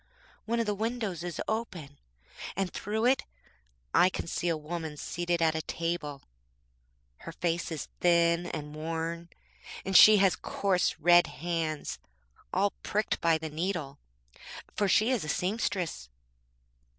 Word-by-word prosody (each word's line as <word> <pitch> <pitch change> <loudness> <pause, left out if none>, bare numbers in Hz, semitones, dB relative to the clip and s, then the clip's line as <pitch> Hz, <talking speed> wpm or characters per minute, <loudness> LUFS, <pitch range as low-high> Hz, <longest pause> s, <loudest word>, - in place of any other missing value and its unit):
One 235 +1 0
of 230 - +1
the 210 - 0
windows 215 -5 -3
is 175 -3 -5
open, 180 -11 -4 0.6
and 195 -2 -2
through 220 +3 -2
it 260 +2 +3 0.7
I 180 - +6
can - - -5
see 170 +1 -2
a 165 - +1
woman 155 0 -5
seated 175 +2 -1
at 160 -1 +3
a 160 - -2
table. 165 -4 -3 0.9
Her - - -9
face 170 0 -2
is 155 - -4
thin 170 0 +3
and 150 -3 -6
worn, 165 +2 -4 0.6
and 190 - -2
she 215 +2 +10
has 190 -4 +4
coarse, 185 +2 0
red 175 0 +6
hands, 160 -1 -3 0.5
all 195 +2 +2
pricked 210 +1 -1
by 165 -1 +4
the 160 -1 -6
needle, 155 -4 -3 0.8
for 205 - +1
she 215 +5 +4
is 245 -8 0
a 155 - -5
seamstress. 180 - -2
175 Hz, 140 wpm, -29 LUFS, 160-195 Hz, 0.9 s, she